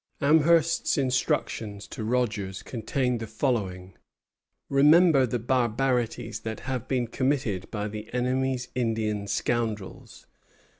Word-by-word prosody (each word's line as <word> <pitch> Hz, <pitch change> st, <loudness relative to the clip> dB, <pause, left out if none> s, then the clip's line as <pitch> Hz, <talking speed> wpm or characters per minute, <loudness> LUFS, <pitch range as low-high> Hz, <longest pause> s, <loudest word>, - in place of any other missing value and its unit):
Amherst's 160 Hz, +3 st, +3 dB
instructions 115 Hz, -6 st, -1 dB
to -, -, -6 dB
Rogers 110 Hz, -5 st, -1 dB
contained 125 Hz, +1 st, -1 dB
the 115 Hz, -, -5 dB
following: 100 Hz, -6 st, -2 dB, 0.7 s
"Remember 145 Hz, 0 st, +5 dB
the 120 Hz, -, -1 dB
barbarities 120 Hz, -1 st, 0 dB
that 110 Hz, 0 st, -6 dB
have 130 Hz, -2 st, -4 dB
been 125 Hz, -2 st, 0 dB
committed 125 Hz, -5 st, -1 dB
by 105 Hz, -1 st, -3 dB
the 105 Hz, +1 st, -7 dB
enemy's 125 Hz, +1 st, -1 dB
Indian 110 Hz, -4 st, -1 dB
scoundrels. 110 Hz, -1 st, -3 dB
120 Hz, 105 wpm, -27 LUFS, 110-130 Hz, 0.7 s, Remember